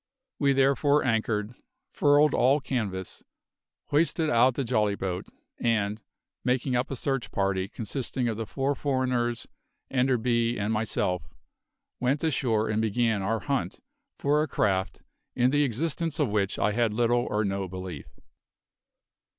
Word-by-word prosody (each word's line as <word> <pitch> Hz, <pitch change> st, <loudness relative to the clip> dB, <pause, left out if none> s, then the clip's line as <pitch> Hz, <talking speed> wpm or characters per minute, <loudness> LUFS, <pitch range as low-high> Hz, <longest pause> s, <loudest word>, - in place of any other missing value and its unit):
We 140 Hz, -2 st, +3 dB
therefore 140 Hz, +2 st, +3 dB
anchored, 110 Hz, -2 st, 0 dB, 0.4 s
furled 145 Hz, +1 st, +4 dB
all 135 Hz, +4 st, +4 dB
canvas, 105 Hz, -9 st, -4 dB, 0.7 s
hoisted 160 Hz, +1 st, +2 dB
out 120 Hz, +2 st, +4 dB
the 140 Hz, -, -1 dB
jolly 110 Hz, -4 st, +1 dB
boat, 90 Hz, -2 st, -4 dB, 0.3 s
and, 110 Hz, -2 st, 0 dB, 0.4 s
making 125 Hz, +1 st, 0 dB
up 125 Hz, +1 st, 0 dB
a 135 Hz, -, -3 dB
search 135 Hz, 0 st, -2 dB
party 95 Hz, -1 st, 0 dB
consisting 120 Hz, +4 st, -3 dB
of 115 Hz, -, -1 dB
the 110 Hz, 0 st, -5 dB
four 135 Hz, +3 st, -1 dB
foreigners, 130 Hz, -4 st, -1 dB, 0.5 s
Enderby, 120 Hz, -2 st, +1 dB
and 105 Hz, +2 st, -1 dB
myself, 90 Hz, -6 st, -1 dB, 0.7 s
went 135 Hz, +5 st, 0 dB
ashore 120 Hz, -8 st, +1 dB
and 110 Hz, 0 st, 0 dB
began 110 Hz, -1 st, +1 dB
our 110 Hz, +3 st, -1 dB
hunt 135 Hz, -11 st, -2 dB, 0.4 s
for 145 Hz, +2 st, +2 dB
a 155 Hz, -, 0 dB
craft 95 Hz, -7 st, -1 dB, 0.3 s
in 125 Hz, 0 st, +3 dB
the 145 Hz, +1 st, +3 dB
existence 155 Hz, +4 st, -1 dB
of 145 Hz, -7 st, +1 dB
which 100 Hz, -1 st, 0 dB
I 105 Hz, -, +2 dB
had 115 Hz, -1 st, +1 dB
little 120 Hz, +1 st, +2 dB
or 105 Hz, 0 st, 0 dB
no 100 Hz, -1 st, -2 dB
belief. 90 Hz, -4 st, -7 dB
120 Hz, 140 wpm, -27 LUFS, 105-135 Hz, 0.7 s, furled